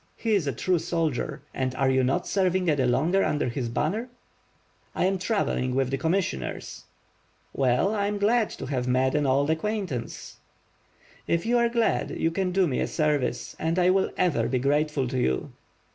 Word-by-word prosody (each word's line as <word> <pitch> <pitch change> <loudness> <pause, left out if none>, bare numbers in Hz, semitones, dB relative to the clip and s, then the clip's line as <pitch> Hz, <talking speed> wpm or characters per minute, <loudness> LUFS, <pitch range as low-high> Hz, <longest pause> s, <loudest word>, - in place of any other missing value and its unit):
He 225 -2 -1
is 190 -8 +1
a - - +1
true 175 +8 0
soldier. 165 -5 -2 0.3
Are 135 0 +2
you 130 0 +2
not 130 +2 0
serving 185 -2 +1
any 140 -3 +1
longer 160 +10 +2
under 145 -4 0
his 120 0 -3
banner?" 220 - -1 0.9
^T. - - 0
am 190 0 +1
travelling 175 - 0
with 135 -1 +1
the 135 - 0
commissioners." 160 - -2 0.7
*^ell, 130 - +2
I 200 -1 0
am 205 0 -2
glad 215 +2 +2
to - - -7
have 130 -2 -2
met 130 +1 +2
an 150 -2 +1
old 140 +3 +2
acquaintance." 170 - -3 0.9
*T[f 170 0 0
you 240 +1 +3
are 235 0 +3
glad, 235 -1 0
you 165 - +1
can 185 +1 -1
do 190 0 +3
me 130 - -1
a - - 0
service; 145 -6 -1
and 165 +2 -1
I 180 0 +4
will 190 0 +2
ever 180 -4 +1
be 130 - 0
grateful 145 +1 +1
to 125 +1 -2
you." 65 - 0
155 Hz, 180 wpm, -26 LUFS, 130-195 Hz, 0.9 s, I